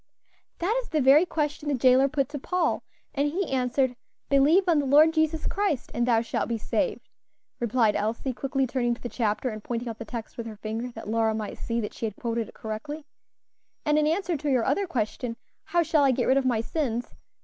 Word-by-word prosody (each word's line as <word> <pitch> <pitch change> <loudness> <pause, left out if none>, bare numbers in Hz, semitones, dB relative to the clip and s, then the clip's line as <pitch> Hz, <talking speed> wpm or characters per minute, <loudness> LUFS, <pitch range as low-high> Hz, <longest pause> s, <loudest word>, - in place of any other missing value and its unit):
"That 380 +7 0
is - - -13
the 310 - +1
very 290 +6 +6
question 300 -2 -2
the 285 - +2
jailer 255 +2 +5
put 275 -1 0
to 290 -1 -5
Paul, 360 +4 0 0.3
and 285 0 +1
he 370 +6 -1
answered, 255 0 +1 0.3
'Believe 285 +7 +5
on 330 -4 +4
the 285 - 0
Lord 305 +4 +6
Jesus 315 0 +1
Christ, 395 -10 -1
and 240 0 0
thou 230 -2 +4
shalt 230 - -2
be 230 - 0
saved,'" 360 - -2 0.5
replied 230 -2 +2
Elsie, 230 +5 -1
quickly 270 +1 -1
turning 240 -1 0
to - - -19
the 240 - -3
chapter 225 +2 -1
and 215 -2 -7
pointing 240 0 -3
out 225 -1 -5
the - - -4
text 225 0 -7
with 230 -1 -5
her 220 - -7
finger, 225 +4 -4
that 225 - -9
Lora 220 0 +1
might 215 -1 -5
see 235 0 -2
that 210 - -5
she 225 - -3
had 210 - -7
quoted 230 -1 -2
it - - -16
correctly. 285 +8 -6 0.8
"And 300 0 +3
in 300 - +2
answer 345 +2 0
to 295 +1 -3
your 255 -4 +2
other 400 -1 +1
question, 230 -3 -3 0.3
'How 345 +1 +2
shall 310 -2 +3
I 275 - +5
get 250 -1 +1
rid 265 - +4
of 270 -1 +2
my 230 -3 +2
sins?' 245 -3 -2
260 Hz, 220 wpm, -26 LUFS, 230-300 Hz, 0.8 s, very